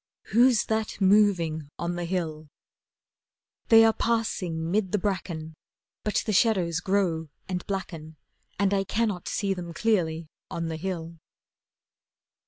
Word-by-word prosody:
Who's 240 0 +5
that 220 -2 -2
moving 185 -7 +3
on 170 +1 -2
the 175 0 -3
hill? 160 -4 -3 1.2
They 225 0 +8
are 225 - +4
passing 180 -9 -1
'mid 195 -2 +1
the - - +4
bracken, 170 -5 -3 0.5
But 210 - 0
the 215 - -1
shadows 180 -6 +2
grow 180 -4 0 0.2
and 180 -1 -3
blacken 165 -5 -5 0.4
And 200 0 +2
I 195 -1 +2
cannot 205 -3 -1
see 200 -2 0
them 175 -3 -7
clearly 170 -7 +1 0.2
on 165 -1 -3
the 160 - -4
hill. 170 -2 -5
185 Hz, 130 wpm, -27 LUFS, 165-210 Hz, 1.2 s, They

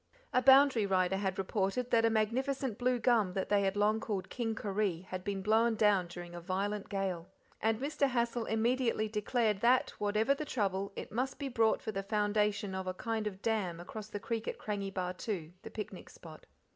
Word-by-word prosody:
A 250 - +4
boundary 265 -4 +6
rider 190 0 +2
had 190 -2 -2
reported 195 +5 -1
that 230 -1 +4
a - - +5
magnificent 240 +2 0
blue 250 0 +2
gum 220 -5 +2
that 190 - -2
they 205 -1 +4
had 195 0 0
long 210 +2 +2
called 205 -4 -4
King 225 -3 -2
Koree 200 -5 -1
had 185 -1 -6
been 195 -1 -3
blown 225 +2 +3
down 205 -4 +3
during 175 0 -9
a 175 - -7
violent 195 +3 -2
gale, 190 -4 -2 0.3
and 220 0 +1
Mr. 280 0 0
Hassal 235 -1 0
immediately 230 0 +1
declared 215 0 0
that, 250 +2 +4
whatever 210 +5 +2
the 280 - -4
trouble, 200 -7 -1
it - - -7
must 255 +4 -2
be 280 -1 -4
brought 225 -3 +2
for 220 - -2
the 195 -2 -3
foundation 210 0 0
of 190 0 -4
a 185 - -2
kind 225 0 -2
of 195 -2 -7
dam 200 -7 0
across 205 +4 -7
the 210 -1 -5
creek 230 +2 -3
at - - -3
Krangi 200 -2 -3
Bahtoo, 180 -2 -3
the - - -8
picnic 210 - -7
spot. - - -13
210 Hz, 195 wpm, -33 LUFS, 195-230 Hz, 0.3 s, boundary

